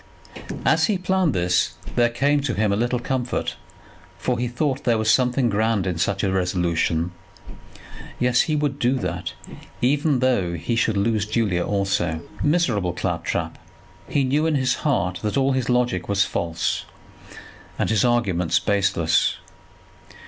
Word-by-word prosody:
As - - +4
he 210 -3 +1
planned 185 -4 +1
this, 90 -1 +1 0.2
there 120 -1 +4
came 140 +5 +1
to 135 -4 -2
him 105 0 +1
a - - +2
little 120 +3 0
comfort, 125 0 -2 0.6
for 120 +6 -1
he 125 - 0
thought 135 +3 -2
there 120 -2 +2
was 110 0 +2
something 125 0 +2
grand 110 -2 +1
in 90 -3 -2
such 95 +3 0
a 95 - +1
resolution. 90 -2 0 1.1
Yes; 125 0 +3
he 155 - +2
would 145 -2 -1
do 125 0 +2
that, 130 - -3 0.5
even 145 +3 +2
though 120 -9 +1
he 115 +8 -2
should 115 -3 +1
lose 105 0 +1
Julia 105 -5 0
also. 100 -5 -1 0.2
Miserable 125 - +1
clap 90 -1 -3
trap! - - -2 0.5
He 140 - +1
knew 145 +5 +1
in 160 - +1
his 130 -2 +2
heart 90 - 0
that 105 +4 -1
all 135 0 +3
his 130 -2 -1
logic 125 -8 0
was 100 -1 +3
false, 85 -3 -2 0.9
and - - 0
his 110 -3 +3
arguments 100 -9 +1
baseless. 95 -5 +1
115 Hz, 155 wpm, -23 LUFS, 95-130 Hz, 1.1 s, As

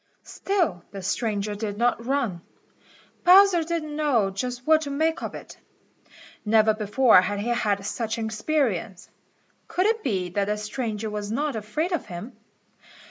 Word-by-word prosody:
Still 350 - -1
the 195 -2 -8
stranger 210 0 -1
did 205 -1 -4
not 235 0 +1
run. 240 -9 -1 0.8
Bowser 365 -1 +7
didn't 315 -2 -3
know 260 -10 +1
just 245 +5 -4
what 315 0 +5
to 290 - -5
make 315 +3 0
of - - -5
it. - - -10 0.9
Never 220 0 +4
before 215 0 +4
had 205 +3 -2
he 220 +4 -3
had 210 -4 0
such 225 +2 -3
an 225 - -2
experience. 220 - -2 0.6
Could 365 - 0
it 445 +1 +2
be 185 -7 -1
that 200 +2 0
the 210 +1 -1
stranger 215 0 -4
was 210 0 -4
not 285 +3 -1
afraid 220 - -2
of 345 - -2
him? 210 +6 -8
225 Hz, 155 wpm, -25 LUFS, 205-295 Hz, 0.9 s, Bowser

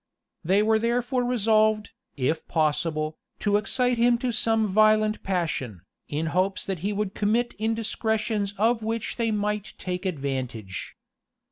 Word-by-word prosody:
They 195 +5 +3
were 220 0 +3
therefore 245 +2 0
resolved, 215 -3 +2 0.3
if 140 +5 -1
possible, 155 0 0 0.2
to 205 -1 +2
excite 245 +4 +1
him 240 0 +4
to 250 0 -1
some 225 -1 +2
violent 215 +1 +3
passion, 160 - -2 0.3
in 150 +2 -2
hopes 185 +2 0
that 190 -3 -3
he 200 +5 -1
would 205 -1 -2
commit 230 +4 +1
indiscretions 220 -2 -1
of 225 +3 +2
which 225 +1 -3
they 230 -2 +1
might 210 -1 -2
make 180 +1 -2
advantage. 130 - -4
210 Hz, 135 wpm, -26 LUFS, 180-225 Hz, 0.3 s, him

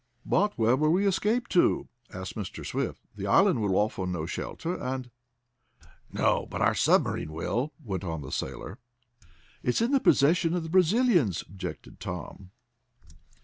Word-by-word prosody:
"But 205 +4 +1
where 115 +2 +4
will 155 +3 +2
we 185 +5 +3
escape 215 +5 +1
to?" - - +3 0.2
asked - - -6
Mr. - - -6
Swift. - - -3 0.2
"The - - -4
island 195 - +4
will 105 0 +2
afford 95 -4 -4
no 85 -3 -3
shelter, 165 - -4
and 130 -1 -4 0.5
" 120 - -30 0.3
"No, - - +1
but - - -4
our - - +3
submarine 75 - +2
will," 120 - -2
went 95 -3 -3
on 80 -4 -4
the 65 - -8
sailor. 110 - -5 0.8
"It's 125 - +1
in 235 +3 +1
the 275 - +4
possession 165 - +3
of 175 - -1
the 160 - -6
Brazilians," 185 - +3
objected 95 +2 -8
Tom. 95 - -7
135 Hz, 155 wpm, -28 LUFS, -, 0.8 s, where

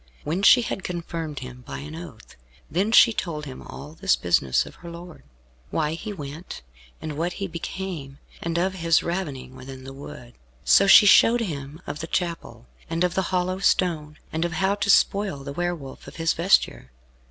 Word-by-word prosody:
When 165 +6 -2
she 245 +4 +7
had 195 - -4
confirmed 165 -4 -5
him 125 -1 -9
by - - -7
an 150 +2 -8
oath, 160 -10 -11 0.4
then 195 +6 +1
she 230 0 +7
told 155 -7 -4
him 130 -2 -8
all 145 +3 -10
this 195 +4 +2
business 75 -7 +2
of - - -11
her 170 - -8
lord 170 0 -10 0.5
why 150 - 0
he 210 +6 -6
went, 150 - -8 0.4
and 155 -2 -5
what 170 +3 -1
he 200 - -4
became, 170 -5 -6 0.2
and 165 0 -2
of 185 +2 +1
his 165 -3 +2
ravening 150 -8 -4
within 130 0 -10
the 135 +1 -9
wood. 135 -3 -10 0.3
So 195 - +6
she 200 - +9
showed 230 +4 +6
him 150 -5 -5
of 145 +1 -5
the 160 - -5
chapel, 170 - -3 0.2
and 165 +2 0
of 180 -1 +1
the 190 - +1
hollow 185 0 0
stone, 155 -6 +1 0.2
and 160 +1 0
of 170 -1 -2
how 190 +3 +1
to 205 0 -2
spoil 195 -7 +3
the 140 0 -6
Were 175 +3 -1
Wolf 135 -5 -11
of - - -10
his 165 -1 +1
vesture. 170 - +2
165 Hz, 190 wpm, -24 LUFS, 145-185 Hz, 0.5 s, she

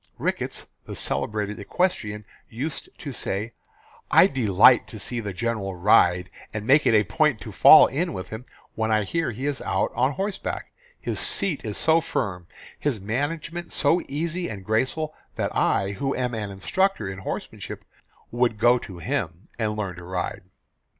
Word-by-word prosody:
Rickets, - - -2 0.2
the - - -6
celebrated 105 -1 -1
equestrian, 105 - -1 0.2
used 135 +7 -5
to 145 -5 -6
say, 110 -2 -3 0.6
"I - - +7
delight 120 -1 +5
to 110 - -8
see 120 +3 -3
the 105 -3 -4
General 100 -1 -2
ride 90 -1 +4 0.2
and 105 -1 -5
make 145 +5 +5
it 115 - +5
a 105 - +5
point 120 +5 +1
to 110 - -7
fall 155 +9 +9
in 170 +7 -1
with 95 -1 -6
him 110 +3 -7 0.3
when 110 0 -1
I 110 -1 +3
hear 165 - -1
he 120 +4 -5
is 145 -2 -2
out - - 0
on 140 - +1
horseback 195 +5 -4 0.3
his - - -3
seat 175 -8 +1
is 105 -2 -4
so 160 +1 +4
firm, 90 - -3 0.3
his 140 -7 -1
management 145 - -3
so 165 +4 +3
easy 165 +5 -2
and 100 -4 -7
graceful 130 +8 0 0.2
that - - -2
I 95 +1 +2
who 135 +7 -2
am 125 -1 -1
an 105 -3 -3
instructor 115 - 0
in 95 0 -6
horsemanship 95 - -6 0.5
would 120 -2 +1
go 120 +3 +4
to 95 -6 -9
him 95 - -3
and 105 -1 -1
learn 95 -4 -3
to 90 - -9
ride." 90 +2 -3
110 Hz, 170 wpm, -25 LUFS, 100-145 Hz, 0.6 s, fall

